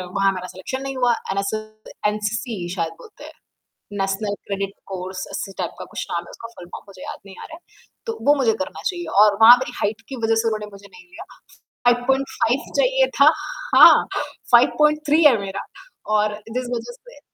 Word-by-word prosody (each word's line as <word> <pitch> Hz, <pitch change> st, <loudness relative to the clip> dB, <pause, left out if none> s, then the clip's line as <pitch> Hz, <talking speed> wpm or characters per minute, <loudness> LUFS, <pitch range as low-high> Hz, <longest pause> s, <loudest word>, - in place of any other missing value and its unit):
वहाँ 195 Hz, 0 st, +3 dB
मेरा 185 Hz, -1 st, -6 dB
सलेक्शन 190 Hz, +9 st, -6 dB
नहीं 270 Hz, 0 st, -5 dB
हुआ 245 Hz, -1 st, +3 dB, 0.2 s
एनएस 200 Hz, +1 st, -1 dB, 0.6 s
एनसीसी 210 Hz, -2 st, -3 dB
शायद 165 Hz, -3 st, -2 dB
बोलते 430 Hz, -, -15 dB
हैं। -, -, -10 dB, 0.7 s
नेशनल 195 Hz, +2 st, -1 dB
क्रेडिट 195 Hz, -1 st, -2 dB, 0.2 s
कोर्स 185 Hz, 0 st, -6 dB
ऐसे 195 Hz, -, -5 dB
टाइप 175 Hz, -3 st, -2 dB
का -, -, -7 dB
कुछ -, -, -5 dB
नाम 170 Hz, -, -2 dB
है -, -, -14 dB
उसका, 230 Hz, -, -10 dB
फुल 230 Hz, -6 st, -13 dB
फ़ॉर्म 175 Hz, -, -10 dB
में -, -, -20 dB
मुझे 190 Hz, -2 st, -14 dB
याद -, -, -7 dB
नहीं 195 Hz, -1 st, -12 dB
आ -, -, -8 dB
रहे 320 Hz, -, -10 dB
हैं, 340 Hz, -, -17 dB, 0.4 s
तो 455 Hz, -1 st, -4 dB
वो 290 Hz, -, +7 dB
मुझे 250 Hz, -6 st, +2 dB
करना 185 Hz, -, -5 dB
चाहिए 350 Hz, -1 st, -2 dB, 0.2 s
और 210 Hz, -1 st, +4 dB
वहाँ 230 Hz, +2 st, +11 dB
मेरी 255 Hz, -1 st, -5 dB
हाइट 215 Hz, +2 st, -2 dB
की 270 Hz, -, -5 dB
वजह 225 Hz, 0 st, +2 dB
से 230 Hz, -, -2 dB
उन्होंने 215 Hz, -1 st, -3 dB
मुझे 200 Hz, 0 st, -14 dB
नहीं 180 Hz, -2 st, -16 dB
लिया। -, -, -10 dB, 0.6 s
5.5 260 Hz, +3 st, +1 dB
चाहिए -, -, +3 dB
था -, -, +8 dB, 0.5 s
हाँ -, -, +9 dB, 0.5 s
5.3 300 Hz, +5 st, +4 dB
है 265 Hz, -6 st, +7 dB
मेरा, 195 Hz, -1 st, -5 dB, 0.5 s
और 210 Hz, 0 st, +2 dB, 0.2 s
जिस 255 Hz, +1 st, -2 dB
वज़ह 240 Hz, -, -6 dB
से -, -, -16 dB
220 Hz, 195 wpm, -21 LUFS, 195-265 Hz, 0.7 s, वहाँ